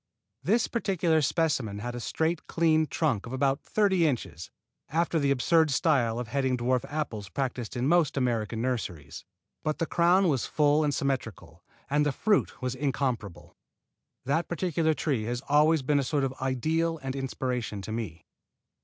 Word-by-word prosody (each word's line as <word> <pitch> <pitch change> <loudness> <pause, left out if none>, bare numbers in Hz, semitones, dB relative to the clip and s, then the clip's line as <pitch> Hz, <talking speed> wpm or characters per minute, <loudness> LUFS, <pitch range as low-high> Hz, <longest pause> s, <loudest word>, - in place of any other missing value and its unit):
This 230 0 +2
particular 180 -8 +1
specimen 140 -9 0
had 120 +4 -5
a 120 - -5
straight, 160 +7 -2
clean 160 -1 +2
trunk 115 -5 -1
of 120 - -7
about 135 +1 +1
thirty 190 -6 +2
inches, 115 - -3 0.4
after 165 +2 +1
the 140 -2 +1
absurd 160 +4 +3
style 135 -6 +2
of 120 -2 -4
heading 130 -1 0
dwarf 125 +1 +1
apples 115 -10 -4
practised 125 +2 -3
in 125 +2 0
most 160 -3 +3
American 115 -3 -1
nurseries. 90 - -4 0.4
But 155 0 -2
the 165 - 0
crown 175 +4 +3
was 135 -7 0
full 150 0 +3
and 150 - +1
symmetrical, 135 -6 -3 0.2
and 145 +2 +2
the 145 - +1
fruit 205 - 0
was 125 -1 -1
incomparable. 130 - -3 0.7
That 155 +6 0
particular 165 -3 0
tree 130 -10 -1
has 120 +2 -3
always 150 +1 +4
been 145 +2 +2
a - - 0
sort 140 +1 0
of 135 -1 -1
ideal 160 +6 0
and 135 0 -3
inspiration 125 -6 -3
to 100 - -6
me. 95 -8 -5
140 Hz, 160 wpm, -28 LUFS, 120-160 Hz, 0.7 s, always